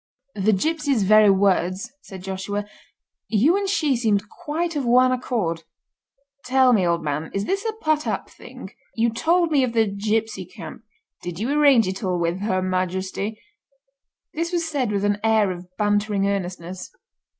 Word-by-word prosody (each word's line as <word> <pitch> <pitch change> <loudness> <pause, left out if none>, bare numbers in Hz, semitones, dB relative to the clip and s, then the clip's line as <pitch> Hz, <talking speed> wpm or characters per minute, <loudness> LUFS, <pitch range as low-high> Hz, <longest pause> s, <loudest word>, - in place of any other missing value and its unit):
"The 210 +1 +1
gipsy's 285 - 0
very 215 +1 +6
words," 195 +2 +1
said 190 -7 -11
Joshua. 195 +2 -4 0.6
"You 245 - +3
and 400 -1 -1
she 305 -8 +1
seem 225 -4 +2
quite 325 - -4
of 285 - -1
one 250 +1 +4
accord. 225 -10 -2 0.8
Tell 255 0 +4
me, 190 -6 +3
old 170 -1 0
man, 150 +1 -3
is 195 +1 -1
this 395 - -1
a 445 - -1
put 310 -7 -1
up - - -2
thing? - - -12 0.2
You 230 0 +2
told 335 +7 +1
me 280 -3 +3
of 245 -2 -1
the 225 -1 +3
gipsy 210 0 -2
camp—did 180 -4 -11
you 230 +8 -2
arrange 280 -7 +5
it 190 +3 -4
all 185 -2 0
with 170 +1 -1
Her 190 -2 -1
Majesty?" 185 +3 -2 0.9
This 335 +3 -2
was 340 -2 -1
said 275 -8 -1
with 200 -1 0
an 205 0 +1
air 220 -3 +3
of 180 0 -8
bantering 205 -1 +1
earnestness. 185 -2 -4
215 Hz, 160 wpm, -23 LUFS, 190-265 Hz, 0.9 s, very